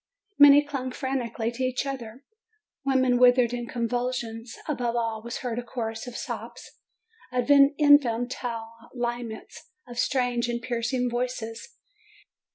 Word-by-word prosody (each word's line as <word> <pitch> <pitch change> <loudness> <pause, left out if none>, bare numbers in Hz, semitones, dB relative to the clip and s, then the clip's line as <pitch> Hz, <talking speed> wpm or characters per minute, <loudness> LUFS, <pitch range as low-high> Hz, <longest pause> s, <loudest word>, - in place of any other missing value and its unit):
Many 290 0 +9
clung 270 -3 -4
frantically 250 -4 -2
to 250 +2 -4
each 255 +1 -1
other. 260 -2 -6 0.6
Women 260 -2 +2
writhed 245 -1 +5
in 240 -1 -4
convulsions. 235 -1 -3
Above 245 -6 -1
all 225 -2 -1
was 235 +2 -6
heard 240 -1 -2
a - - -5
chorus 225 -1 -5
of 245 - -6
sobs, - - -7 0.6
of 250 +2 0
infantile 255 -5 +3 0.2
laments, 240 +4 -5 0.2
of 240 0 -7
strange 245 -3 0
and 235 0 -1
piercing 245 +1 -1
voices. 240 - -4
245 Hz, 125 wpm, -26 LUFS, 235-260 Hz, 0.6 s, Many